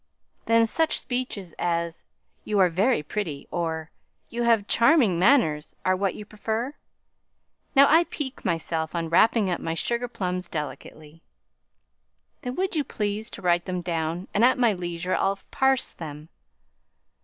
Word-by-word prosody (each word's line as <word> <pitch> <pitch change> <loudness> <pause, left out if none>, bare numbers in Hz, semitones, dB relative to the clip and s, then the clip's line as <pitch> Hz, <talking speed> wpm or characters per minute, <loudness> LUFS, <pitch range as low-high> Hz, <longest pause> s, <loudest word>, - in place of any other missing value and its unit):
"Then 230 0 +5
such 320 +8 +1
speeches 245 -8 -4
as 170 -1 -2 0.4
'you 210 - -1
are 185 -2 +5
very 195 +2 +1
pretty,' 155 -4 -4
or 160 -2 -3 0.4
'you 235 - -3
have 230 -3 +3
charming 230 - +4
manners,' 180 - +3
are 185 - +3
what 195 0 -1
you 210 - -8
prefer. 220 +5 -3 1.0
Now, 275 +1 +8
I 330 +3 +5
pique 275 -6 -6
myself 165 -2 -2
on 165 -1 -2
wrapping 210 +3 +4
up 175 - -2
my 165 0 -2
sugar 235 +7 -1
plums 185 -6 -3
delicately." 150 +1 -7 1.2
"Then 250 0 -4
would 375 -1 -1
you 300 - +1
please 215 -2 -3
to - - -10
write 175 -1 +2
them 180 -1 -3
down, 170 +1 -3
and 210 - +2
at 255 - +5
my 240 -4 +3
leisure 175 0 -3
I'll 195 0 +1
parse 265 -1 +2
them." 155 -1 -9
190 Hz, 150 wpm, -25 LUFS, 170-235 Hz, 1.2 s, Now